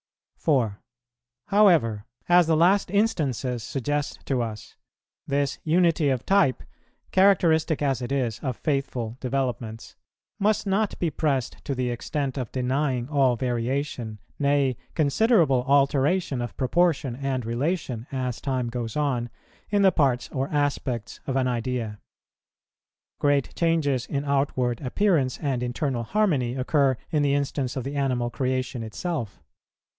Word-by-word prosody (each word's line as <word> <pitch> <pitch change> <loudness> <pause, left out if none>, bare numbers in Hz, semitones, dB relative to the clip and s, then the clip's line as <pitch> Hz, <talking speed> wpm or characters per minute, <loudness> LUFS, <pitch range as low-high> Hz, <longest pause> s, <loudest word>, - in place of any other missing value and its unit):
4. 120 -9 +1 0.7
However, 165 - +4 0.2
as 175 -1 +5
the 160 -1 +3
last 185 +5 +4
instances 145 - 0
suggest 145 +4 -3
to 130 -3 0
us, 110 -2 -6 0.5
this 140 -1 0
unity 165 -2 +3
of 130 -2 -1
type, 195 -10 +3 0.5
characteristic 165 -6 +3
as 135 -3 0
it 125 - -4
is 125 -6 -1
of 130 -4 -3
faithful 130 -5 -2
developments, 125 -4 -3 0.4
must 210 +1 +1
not 200 +2 0
be 170 -3 -1
pressed 140 -4 -1
to 140 - -3
the 125 -1 -1
extent 135 +3 -3
of 125 -4 -4
denying 130 -1 -1
all 135 -4 +3
variation, 120 -1 -2 0.2
nay, 140 -2 +2 0.2
considerable 155 - +3
alteration 140 +1 +2
of 120 - -6
proportion 145 -2 +1
and 130 -2 -2
relation, 125 -1 -2
as 130 -3 -3
time 130 -3 -1
goes 115 -1 -4
on, 130 -5 0 0.4
in 205 -1 +2
the 190 - +6
parts 135 -7 +1
or 135 0 -2
aspects 140 -6 -2
of 135 - -1
an 130 -1 +2
idea. 120 -3 -2 1.2
Great 145 -2 +1
changes 150 -7 +1
in 140 0 -2
outward 135 -4 0
appearance 145 -2 +1
and 135 -4 -2
internal 125 0 -1
harmony 140 - +1
occur 135 0 +2
in 155 -3 +2
the 140 -1 +2
instance 140 -2 -2
of 130 - -3
the 140 +3 -5
animal 125 -4 0
creation 130 -2 -2
itself. 115 - -4
135 Hz, 135 wpm, -25 LUFS, 125-150 Hz, 1.2 s, the